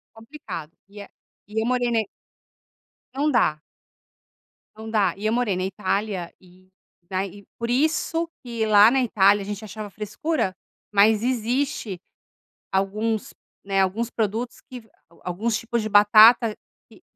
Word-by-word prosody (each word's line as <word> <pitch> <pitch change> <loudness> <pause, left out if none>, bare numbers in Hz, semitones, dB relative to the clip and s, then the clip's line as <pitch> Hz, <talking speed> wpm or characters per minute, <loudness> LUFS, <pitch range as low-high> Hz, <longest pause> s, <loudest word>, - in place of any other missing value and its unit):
Complicado 225 - -9 0.2
e 205 0 -10
a - - -14 0.4
e 220 +1 -2
eu 225 - -1
morei 245 -1 +1
na 225 -1 +2 1.1
Não 295 +2 +1
dá. 155 - +2 1.2
Não 220 0 -8
dá. 200 -5 +2
E 210 +2 -4
eu 220 - +1
morei 235 -6 0
na 185 - -2
Itália 195 -1 -2
e 185 0 -22 0.4
daí 195 +1 -4
por 235 0 -3
isso 315 +4 0
que 235 -3 -3
lá 210 +1 +7
na 265 0 +2
Itália, 205 -3 +3
a - - -6
gente 205 +1 -6
achava 210 0 -8
frescura, 210 - -2 0.4
mas 210 +2 +4
existe 240 -5 -1 0.7
alguns, 210 +3 -1 0.3
né, 195 -1 +1
alguns 220 +5 -1
produtos 225 +2 -3
que 240 -4 -12 0.3
alguns 210 +6 -1
tipos 235 0 -2
de 215 - -4
batata 215 +2 +6 0.3
que - - -19
215 Hz, 140 wpm, -23 LUFS, 195-235 Hz, 1.2 s, lá